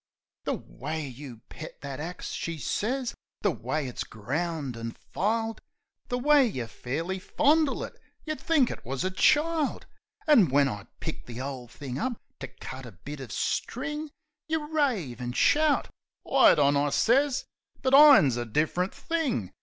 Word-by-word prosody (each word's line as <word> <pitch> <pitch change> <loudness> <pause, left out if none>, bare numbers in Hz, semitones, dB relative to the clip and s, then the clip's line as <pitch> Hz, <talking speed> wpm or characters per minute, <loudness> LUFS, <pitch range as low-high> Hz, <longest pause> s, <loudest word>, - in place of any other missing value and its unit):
"The - - 0
way 155 +2 -5
you 125 -3 -10
pet 160 - -10
that 140 -1 -6
axe," 175 +4 -5
she 165 -1 -4
sez 240 - -1 0.3
"the 205 - +2
way 130 +3 -3
it's 125 - -4
ground 140 +4 -3
an' 115 0 -5 0.2
filed, 225 +3 -1 0.5
The 245 - -1
way 285 +1 +5
you 130 - -3
fairly 160 +11 -4
fondle 300 +7 +2
it, - - -9 0.2
you'd 310 -1 -3
think 295 -7 +3
it - - -8
wus 130 +2 -3
a 185 - 0
child! 305 - +2 0.4
An' 235 - +6
when 140 +1 +4
I 105 -6 -5
pick - - -5
the 120 0 -7
ole 130 -2 -5
thing 130 +1 -6
up 250 -2 -2 0.2
to 130 - -5
cut 130 0 -9
a - - -10
bit 145 +10 -9
uv 130 -3 -8
string 295 +5 -2 0.4
Yeh 320 0 +1
rave 215 - 0
an' 120 0 -3
shout.. 300 - +3 0.2
." - - -57
"Wait - - +6
on," 145 -1 +4
I 145 +1 +2
sez. 260 - +2 0.4
"But 260 0 +1
ir'n's 275 - +8
a 120 - -2
different 160 - 0
thing. 290 - -1
160 Hz, 165 wpm, -28 LUFS, -, 0.5 s, ir'n's